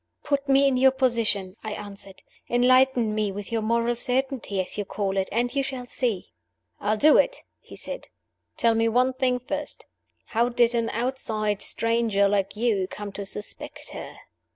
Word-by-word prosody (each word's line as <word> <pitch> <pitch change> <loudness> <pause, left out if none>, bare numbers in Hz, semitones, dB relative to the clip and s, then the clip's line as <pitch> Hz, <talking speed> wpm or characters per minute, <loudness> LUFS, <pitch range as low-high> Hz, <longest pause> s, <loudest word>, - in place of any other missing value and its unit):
"Put 280 -1 -1
me 275 +1 +5
in 265 -2 +2
your 265 +1 +6
position," 230 -7 0
I 215 -1 -4
answered. 200 -2 -10 0.3
"Enlighten 250 -2 +4
me 210 -1 0
with 205 +3 -7
your 225 -1 0
moral 235 +2 +1
certainty 250 -4 -1
(as 185 - -3
you 210 - -2
call 195 -1 -3
it) 190 -1 0
and 240 +3 0
you 280 - +1
shall 260 -2 -4
see!" 240 - -2 0.5
"I'll 210 +1 0
do 300 +7 +6
it!" - - +1 0.2
he - - -13
said. - - -6 0.5
"Tell 230 -1 +3
me 225 0 +2
one 250 +3 +2
thing 255 -1 +1
first. 290 +4 -5 0.4
How 235 +2 +1
did 240 -1 +3
an 230 -1 0
outside 220 -4 -1
stranger, 230 -3 +2
like 200 0 0
you, 210 -4 +1
come 205 +1 -7
to 200 0 -5
suspect 210 +1 -5
her?" - - -8
230 Hz, 175 wpm, -25 LUFS, 205-255 Hz, 0.5 s, your